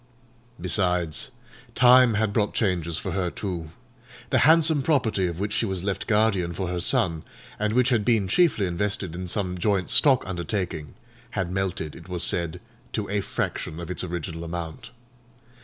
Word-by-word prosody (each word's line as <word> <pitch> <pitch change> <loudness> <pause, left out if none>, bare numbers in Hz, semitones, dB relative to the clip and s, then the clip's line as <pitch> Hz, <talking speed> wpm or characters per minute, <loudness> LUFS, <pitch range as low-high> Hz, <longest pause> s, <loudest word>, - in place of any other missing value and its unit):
Besides, 90 -7 +2 0.5
time 125 -2 +6
had 105 -1 0
brought 105 -1 0
changes 85 -6 0
for - - -4
her, 95 -2 -1
too: 85 -4 -5 0.6
the - - +3
handsome 160 -2 +5
property 120 - +1
of 85 0 -5
which 105 +1 -2
she 115 - 0
was 95 -2 -4
left 100 -1 -3
guardian 105 -6 +1
for 95 -1 -3
her 90 0 -2
son, 85 -2 +2 0.4
and 105 0 0
which 125 +1 +3
had 120 -5 +2
been 110 -3 +2
chiefly 125 - +3
invested 95 -1 -2
in 90 +1 -5
some 90 -1 -2
joint 95 -1 +1
stock 135 -3 +5
undertaking, 90 -4 -4 0.4
had 90 -2 -1
melted, 95 -5 -3
it 85 +1 -13
was 90 -2 -1
said, 85 -3 -1 0.3
to - - -2
a 105 0 0
fraction 80 -4 -4
of 85 +1 -6
its 90 - -1
original 85 -2 -5
amount. 85 +7 -6
95 Hz, 165 wpm, -25 LUFS, 85-110 Hz, 0.6 s, time